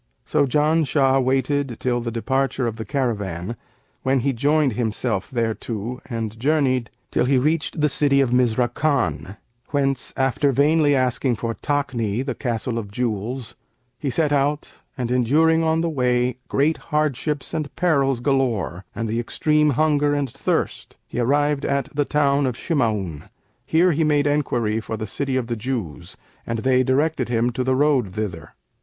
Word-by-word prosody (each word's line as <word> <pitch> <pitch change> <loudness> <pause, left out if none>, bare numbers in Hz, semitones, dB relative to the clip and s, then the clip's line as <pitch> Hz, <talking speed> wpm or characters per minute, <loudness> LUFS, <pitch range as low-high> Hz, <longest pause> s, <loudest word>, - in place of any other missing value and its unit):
So 145 -2 +2
Janshah 145 -2 +2
waited 135 0 0
till 120 -1 0
the 115 - -3
departure 130 +3 -1
of 115 -1 -3
the 110 - -5
caravan, 105 - -2 0.5
when 130 0 +1
he 135 +2 0
joined 145 +2 +2
himself 110 -2 -2
thereto 115 0 -3
and 110 -2 -4
journeyed, 130 -4 +1 0.2
till - - +2
he 135 +1 +3
reached 155 +4 0
the 150 - +4
city 140 -1 +2
of 135 -3 +2
Mizrakan 120 - +1 0.3
whence, 135 -2 0
after 135 +1 +2
vainly 145 +2 +3
asking 130 -1 +1
for 115 +1 -3
Takni, 125 -5 -1
the 130 - -2
Castle 120 -1 -2
of 105 -3 -7
Jewels, 115 +2 -3 0.5
he 140 - -2
set 150 +2 +1
out 145 +1 0 0.3
and 125 -2 -2
enduring 155 +7 +3
on 160 0 +2
the 170 - 0
way 125 -3 +1
great 150 +4 +1
hardships 150 -2 -1
and 155 -3 -2
perils 140 -8 +2
galore 120 -9 0
and 115 - -2
the 115 +2 -1
extreme 150 +5 +2
of 140 - 0
hunger 145 0 +2
and 140 -4 -1
thirst, - - -2
he - - -5
arrived 145 +3 +1
at 140 -1 -1
the 145 -1 +1
town 140 -2 +2
of 125 -2 -3
Shima'un. 105 - -1 0.4
Here 175 +3 +4
he 160 +1 +1
made 145 -2 +2
enquiry 120 -7 0
for 110 0 -5
the 110 - -4
City 135 +5 -2
of 130 - -1
the 120 0 -3
Jews, 110 - -5 0.3
and 115 - -1
they 130 -1 +4
directed 130 0 +1
him 120 0 +1
to 125 +2 -2
the 130 0 +1
road 130 -9 +2
thither. 90 -8 -5
130 Hz, 160 wpm, -22 LUFS, 115-145 Hz, 0.5 s, the